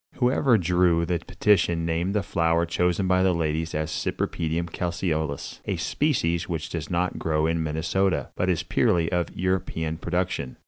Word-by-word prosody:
Whoever 125 -1 +3
drew 90 -2 +2
the 85 0 0
petition 85 -2 +1
named 85 +4 -1
the 105 - +1
flower 85 -1 +1
chosen 90 +2 0
by 90 0 +3
the 95 -1 +3
ladies 80 0 -1
as 80 0 -2
"Cypripedium 80 +1 -2
Calceolous," 80 -5 -2
a - - -1
species 85 - 0
which 80 -3 -3
does 80 -4 -4
not 90 +1 -1
grow 80 -1 +1
in 80 0 0
Minnesota, 80 +2 0
but 95 - 0
is 85 -4 +1
purely 85 -2 +1
of 90 -1 0
European 90 -4 -1
production. 85 -5 -2
85 Hz, 155 wpm, -25 LUFS, 80-90 Hz, -, Whoever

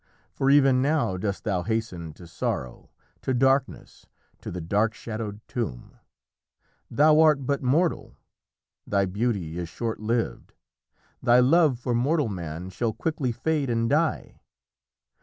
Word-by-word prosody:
For 135 - 0
even 135 -2 +5
now 145 -8 +1
dost 100 +1 -3
thou 95 -5 0
hasten 95 -6 -3
to 85 - -14
sorrow, 65 -6 -4 0.3
to 130 - -1
darkness, 135 +1 0 0.3
to - - -7
the 90 - -5
dark 105 +7 0
shadowed 110 -2 -6
tomb. 105 - -5 0.9
Thou 155 +1 +4
art 150 -4 +4
but 140 +1 0
mortal! 155 +7 0 0.7
thy 100 -1 +2
beauty 95 -4 -2
is 85 -2 -5
short 115 +5 -4
lived. 115 +2 -2 0.7
Thy 120 0 +5
love 145 +1 +4
for 120 0 -2
mortal 135 +2 +1
man 85 -1 -6
shall 110 +4 -2
quickly 145 -4 -2
fade 140 +3 -1
and 115 -1 +1
die. 155 +5 0
120 Hz, 135 wpm, -25 LUFS, 100-135 Hz, 0.9 s, even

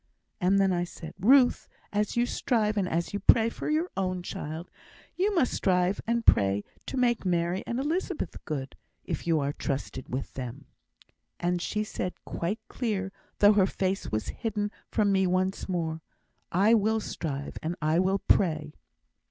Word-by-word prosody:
And 195 +1 +3
I 175 0 +1
said 170 -2 -8
then, 200 +6 +1
'Ruth, 265 -2 +5 0.3
as 210 +2 0
you 240 - +4
strive 220 -4 0
and 195 -3 0
as 170 +3 -1
you 205 - -1
pray 225 +3 +5
for - - -5
your 315 +4 +1
own 185 -2 -1
child, 160 +1 -6
so - - -24
you 405 +1 +2
must 265 -8 +2
strive 180 +1 +1
and 235 0 0
pray 100 +1 +4 0.2
to 270 - -4
make 240 -2 +2
Mary 175 0 0
and 235 - -1
Elizabeth 315 - -2
good, 135 -3 -4 0.3
if - - -4
you 165 -2 +3
are 140 0 -1
trusted 135 -2 -4
with 130 +2 -4
them.' 130 +2 -6 0.7
And 175 0 0
she 210 +4 -1
said 185 -3 -3
out - - -41
quite 190 +7 -2
clear, 200 -6 -2 0.3
though 205 +1 +7
her 195 -2 +4
face 190 0 -2
was 110 0 -1
hidden 210 -3 -2 0.2
from 205 -2 +2
me 190 -1 +3
once 185 +2 0
more, 165 -3 -2 0.5
'I 200 +6 +4
will 220 0 +3
strive, 145 -8 -4
and 165 +2 -2
I 155 +2 +2
will 190 +1 +2
pray.' 155 -6 +1
190 Hz, 175 wpm, -28 LUFS, 165-215 Hz, 0.7 s, though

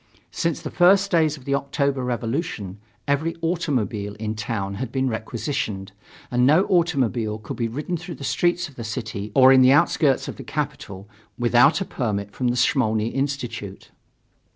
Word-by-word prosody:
Since 170 -2 -2
the - - -5
first 195 +2 +4
days 160 -3 +2
of 130 - -16
the 140 - -1
October 140 -1 0
revolution, 120 - -3 0.3
every 150 +4 0
automobile 120 - -1
in 110 0 -3
town 105 -2 -3
had 130 - -4
been 135 -1 0
requisitioned, 110 -3 -3 0.4
and 125 0 +2
no 155 +8 +5
automobile 130 - +1
could 110 -2 -8
be 115 - 0
ridden 150 +9 -3
through 170 +1 -8
the - - -10
streets 175 +5 +1
of 145 - -18
the 115 - -5
city 110 -3 -5
or 130 -1 +8
in 130 - +6
the 130 0 +6
outskirts 145 -2 +3
of - - -6
the - - -8
capital 95 +1 -5 0.3
without 120 +8 +4
a - - -1
permit 105 - -3
from 125 +5 -2
the 120 +1 0
Smolny 110 -4 +2
Institute. 125 -8 -4
130 Hz, 170 wpm, -23 LUFS, 110-150 Hz, 0.4 s, or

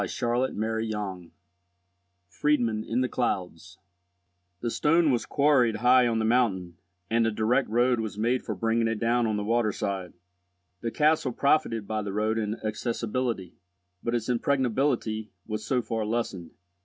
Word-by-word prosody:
CHAPTER 120 +6 0
XVIII 105 -5 -3 1.0
FRIEDMUND 115 - 0
IN 120 +3 0
THE 130 - +1
CLOUDS 90 -8 -3 0.8
THE 120 - -2
stone 160 +3 +3
was 120 - -1
quarried 140 -6 +3
high 125 +2 +5
on 115 -1 0
the 110 - 0
mountain, 100 -8 +1 0.3
and 115 0 +3
a - - +1
direct 110 +5 +1
road 120 +2 +2
was 110 -2 -4
made 120 +4 +1
for 110 - -4
bringing 115 +3 +1
it 115 -1 -1
down 120 +2 +1
to 110 -1 0
the 105 - -2
water 115 0 +1
side. 95 -3 -4 0.7
The 115 - -1
castle 150 0 +2
profited 115 -8 +1
by 110 -1 -1
the 100 -1 -5
road 110 +2 0
in 105 0 -3
accessibility, 115 -2 -2 0.4
but 120 0 -1
its 115 -2 -2
impregnability 125 -3 0 0.2
was 110 -1 -4
so 125 +2 0
far 110 -1 -2
lessened. 105 -6 -3
115 Hz, 155 wpm, -27 LUFS, 105-125 Hz, 1.0 s, high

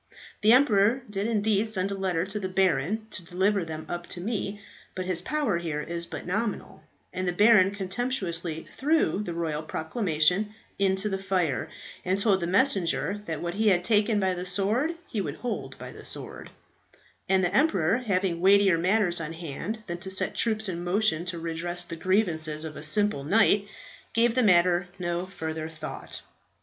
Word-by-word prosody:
The 215 +1 +5
emperor 240 -1 +4
did 200 +1 -1
indeed 215 -1 +1
send 195 -2 -1
a - - -1
letter 185 -3 -1
to 205 +2 -4
the 190 -2 -3
baron 190 +3 +1
to 185 - -1
deliver 190 +3 +1
them 160 -1 -6
up 175 0 -5
to 175 - -4
me; 205 0 -3 0.4
but 185 - -3
his 185 -2 0
power 285 - 0
here 160 -3 -3
is 170 +1 -4
but - - -7
nominal, 210 +4 -3 0.3
and 185 0 -2
the - - +2
baron 205 0 +5
contemptuously 190 -5 -2
threw 300 -7 +1
the 175 -5 -5
royal 160 -3 -2
proclamation 180 +4 0 0.2
into 190 +1 +2
the 195 -2 -2
fire, 185 -8 -1 0.3
and 185 +1 0
told 200 -2 +3
the 170 - -2
messenger 200 -2 +1
that 160 -4 -4
what 170 0 -2
he 220 +3 0
had 180 -3 +4
taken 210 +1 +3
by 190 -2 +1
the 180 0 -4
sword 205 - 0
he 215 - -2
would - - -4
hold 245 - -5
the - - -10
sword; - - -5 0.8
and 190 -1 +3
the 180 +1 0
emperor, 225 - +3
having 185 -7 -1
weightier 195 -2 +5
matters 180 -1 +2
on 165 0 -5
hand 170 +7 -6
than 175 -1 -5
to 190 +1 -7
set 190 - 0
troops 220 -2 +2
in 175 -2 -4
motion 180 -2 +1
to 180 -1 -3
redress 170 +2 -2
the 165 - -7
grievances 160 -4 0
of 155 -1 -7
a - - -7
simple 160 0 +2
knight, 200 +4 +3 0.5
gave 230 0 +3
the 255 - +3
matter 180 -3 +4
no 175 0 -2
further 160 -3 -5
thought. 155 -1 -6
190 Hz, 180 wpm, -27 LUFS, 170-210 Hz, 0.8 s, The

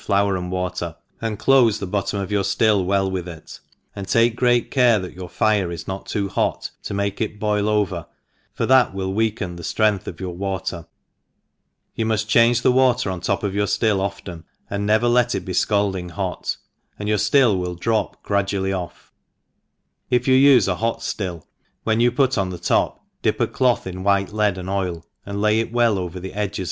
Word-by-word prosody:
4oar 100 -1 +2
and 90 -1 -4
water, 90 -2 -3 0.3
and 110 -2 -2
dofe 120 -4 +4
the 100 - -4
bot 100 +1 -2
i* - - -12
torn 100 -1 -2
of 95 - -7
your 100 -1 +2
ftill 105 0 +2
well 95 +1 +1
with 90 -2 -3
it, 80 -2 -10 0.4
and 100 -1 -6
take 115 +2 +3
great 120 -1 +2
care 125 -4 +4
that 95 -2 -6
your 90 -1 -8
fire 105 -4 +1
is 85 - -7
not 95 +1 -5
too 100 -2 -1
hot 95 - -1
to - - -7
make 100 +1 -2
it 110 -1 -2
boil 105 0 0
over, 95 -6 0 0.4
for - - -2
that 130 -6 +4
will 95 -1 -2
weaken 105 -5 -1
the - - -8
ftrength 105 +2 0
of 85 - -7
your 95 -2 -4
water; 95 -2 -4 1.1
you 115 - -2
muft 110 -1 0
change 115 +2 +4
the - - +5
water 125 -4 +2
on 90 - -4
the 90 - -8
top 100 -1 0
of 100 -2 -1
your 105 +1 0
£bill 105 0 +1
often, 95 -4 -5 0.3
and 100 0 -2
never 110 +3 +3
let 120 0 +3
it - - -4
be 95 - -5
fcaldini'hot^ 95 -2 -1 0.4
and 105 - -5
your 105 -1 +1
ftUI 105 -2 +3
will 90 -1 -3
drop 110 +5 -1
gradually 100 -1 0
off; 90 -2 -7 1.0
ii 125 - +5
yoa 130 +2 +5
ufe 105 - +2
a 95 - +1
hot 115 0 -2
Hill, 90 -5 -4 0.4
when 110 0 +1
you 120 +1 +4
put 130 -2 +1
on 95 -1 0
the 90 - -6
top, 85 - 0 0.2
dip - - 0
a - - +3
cloth 125 -2 +1
in 95 0 -6
white 100 +1 +1
lead 105 -3 +1
and 90 0 -6
oil, 90 -4 -2 0.2
and 100 0 -4
lay 105 +1 +3
it 115 0 -2
well 120 -4 +2
over 90 0 -5
the 95 +1 -7
edges 105 0 -3
100 Hz, 205 wpm, -22 LUFS, 95-110 Hz, 1.1 s, the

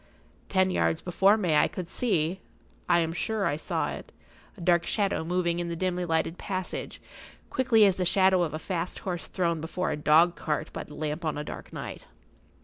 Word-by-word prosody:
Ten 185 -1 +3
yards 160 -2 +1
before 195 +4 +3
me 180 -7 +1
I - - +5
could 180 -2 -6
see—I 175 -3 -1
am 165 0 -1
sure 210 +3 -1
I 145 - +1
saw 155 - -2
it—a - - -13
dark 170 -1 +3
shadow 200 -4 0
moving 175 0 0
in 170 0 -2
the 170 - -3
dimly 180 0 -1
lighted 165 +1 0
passage, 185 -2 -4 0.5
quickly 240 -5 +4
as 195 -2 +3
the 185 - 0
shadow 190 0 +4
of 155 -3 -1
a - - -1
fast 175 +1 -3
horse 180 -3 -3
thrown 170 -4 -1
before 180 +3 -2
a - - 0
dog 160 +4 +4
cart 150 - -3
by - - -4
the 150 - -12
lamp 155 +2 -3
on 155 -2 -1
a 150 - -3
dark - - -8
night. - - -7
175 Hz, 190 wpm, -28 LUFS, 165-190 Hz, 0.5 s, I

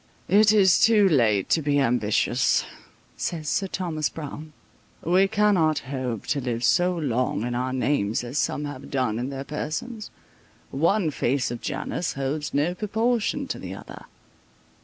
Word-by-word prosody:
"It 205 +3 +6
is 195 -4 +5
too 215 -3 +5
late 115 - +2
to 160 - +3
be 145 -1 +1
ambitious," 120 -1 +1 0.5
says 160 -3 -3
Sir 195 +6 0
Thomas 165 -5 -2
Browne. 155 0 -8 0.5
"We 185 +4 +3
cannot 170 -9 +1
hope 125 -5 -3
to 140 - 0
live 120 -2 -3
so 180 +4 +3
long 130 -7 -1
in 120 0 -2
our 125 +1 -1
names 125 -5 0
as 125 +4 -3
some 150 - -1
have 145 -2 -8
done 125 -5 -1
in 125 +2 -3
their 135 -1 -5
persons; 155 - -5 0.6
one 165 +4 +1
face 130 -2 0
of 120 - -6
Janus 175 - -3
holds 140 +2 -3
no 150 +5 +1
proportion 230 +7 -1
to - - -3
the - - -7
other." - - -11
150 Hz, 155 wpm, -25 LUFS, 130-185 Hz, 0.6 s, It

